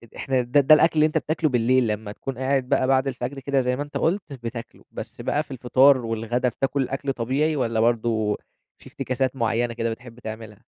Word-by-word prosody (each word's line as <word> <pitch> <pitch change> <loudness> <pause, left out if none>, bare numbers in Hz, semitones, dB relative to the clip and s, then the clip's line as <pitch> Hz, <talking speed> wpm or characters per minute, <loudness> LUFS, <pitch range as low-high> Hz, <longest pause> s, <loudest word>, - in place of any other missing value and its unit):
إحنا 130 -2 0
ده 125 +4 +2
ده 145 +3 +7
الأكل 160 +1 +3
اللي 155 - +5
أنت 155 0 0
بتاكله 155 +1 0
بالليل، 125 0 +2
لما 105 0 -3
تكون 130 +4 -6
قاعد 130 -1 0
بقى 130 -2 +2
بعد 135 0 +2
الفجر 130 +1 -4
كده 135 0 0
زي 125 0 0
ما 140 - -3
أنت 145 - -6
قُلت 185 +5 +1 0.2
بتاكله، 115 0 -7
بس - - -8
بقى 150 - 0
في 140 - -17
الفطار، 130 +2 +4
والغدا 115 +2 -1
بتاكل 135 +2 -1
الأكل 135 +1 -2
طبيعي 135 +7 0
والّا 115 -5 0
برضه 110 -2 +1 0.4
في - - -16
افتكاسات 130 +1 -2
معينة 115 0 0
كده 115 -1 -2
بتحب 120 +1 -10
تعملها؟ 110 -2 -9
130 Hz, 200 wpm, -24 LUFS, 115-135 Hz, 0.4 s, ده